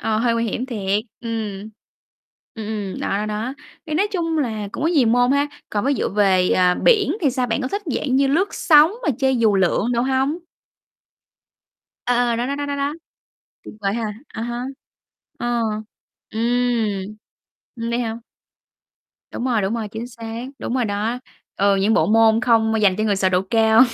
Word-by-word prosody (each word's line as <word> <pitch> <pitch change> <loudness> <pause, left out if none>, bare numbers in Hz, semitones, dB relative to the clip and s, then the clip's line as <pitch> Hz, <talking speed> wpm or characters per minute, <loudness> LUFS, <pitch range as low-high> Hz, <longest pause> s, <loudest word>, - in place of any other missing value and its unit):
Ờ, 220 -1 0
hơi 235 0 +2
nguy 230 0 0
hiểm 240 +3 -2
thiệt. 205 -4 -1 0.2
Ừm. 220 -3 -4 0.8
Ừm, 220 -2 -6
ừm, 210 -3 -4
đó, - - -2
đó, 210 - -2
đó. 220 +5 -3 0.3
Thì 305 - -3
nói 400 +5 +2
chung 330 -3 -1
là 220 -7 -2
cũng - - -5
có - - +3
nhiều 290 -9 +3
môn 245 +3 +3
ha. 285 +1 +2 0.2
Còn 205 +2 -1
ví 280 - +3
dụ - - -1
về, 190 -3 +3
ờ, 180 -1 +4
biển 410 -8 +3
thì 280 - +3
sao? 250 -1 -1
Bạn 225 +4 -1
có 255 - -2
thích 405 +8 -3
dạng 260 -2 0
như 275 0 +4
lướt 345 +9 +2
sóng 310 +2 +5
mà - - -1
chơi 265 -1 +2
dù 220 -3 +3
lượn 195 +5 +1
đồ 235 - +1
hông? 270 +5 0 1.7
À, 245 -1 +2
ờ, 230 - 0
đó, 240 +1 -1
đó, 280 - -2
đó, 285 0 -3
đó, 285 0 -2
đó. 280 +2 -1 0.7
Tuyệt - - -10
vời 195 0 0
ha. 235 - -2 0.3
À 225 - -7
ha. 240 +1 -3 0.7
Ờ. 240 0 0 0.7
Ừm. 225 -4 0 0.6
Ừm, 230 -1 -4
vậy 235 - 0
hả? 225 -2 -2 1.2
Đúng 245 - -4
rồi, 235 -5 +1
đúng 195 +4 -1
rồi, 220 -3 -3
chính 225 +3 -6
xác, 230 0 -7
đúng 240 - -3
rồi 255 -2 +1
đó. 215 +4 -2 0.4
Ừ, 200 0 +3
những 205 +3 +2
bộ 160 - +3
môn 225 +1 +4
không 225 -2 +3
m 225 - +1
dành 200 -4 +3
cho 215 - +1
người 205 -2 +1
sợ 190 -1 +2
độ 185 0 +2
cao. 220 +3 +4
230 Hz, 200 wpm, -21 LUFS, 215-260 Hz, 1.7 s, sóng